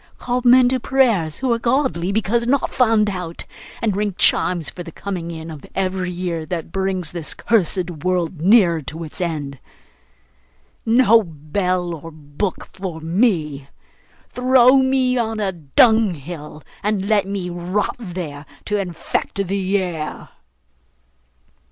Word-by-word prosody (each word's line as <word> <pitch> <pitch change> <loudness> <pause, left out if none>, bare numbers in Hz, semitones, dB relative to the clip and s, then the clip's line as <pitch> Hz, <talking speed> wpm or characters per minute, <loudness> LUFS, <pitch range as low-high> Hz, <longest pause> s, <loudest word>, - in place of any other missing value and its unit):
Call 250 0 -1
men 250 0 +7
to 260 0 0
prayers 230 - +2
who 260 -2 +1
are 230 - -1
godly 235 -8 0
because 220 +3 0
not 275 +2 +1
found 225 -4 +3
out, 180 -4 -5 0.4
and 215 -4 +1
ring 205 -2 -1
chimes 175 -4 +2
for 180 - -7
the 170 -1 -8
coming 180 -2 -5
in 160 -1 -7
of 150 -3 -10
every 185 -1 -1
year 175 -2 -3
that 165 0 -5
brings 190 -4 -2
this 170 -3 -6
cursed 185 -5 +1
world 180 -3 -1
nearer 180 -4 +5
to 155 +4 -6
its 160 +4 -7
end. 145 -6 -3 1.3
No 230 -1 +6
bell 175 +2 -2
or 165 0 -8
book 155 +4 -5
for 185 -4 -5
me! 160 - 0 0.6
Throw 255 +1 +5
me 260 -1 +2
on 225 -1 -1
a 200 -2 0
dunghill, 170 - +1 0.2
and 205 -2 -1
let 205 -2 +2
me 195 -3 -3
rot 180 +4 -2
there, 170 -8 -6 0.2
to 210 -1 0
infect 190 +2 -3
the 195 +1 0
air! 170 -5 -4
185 Hz, 140 wpm, -20 LUFS, 165-220 Hz, 1.3 s, men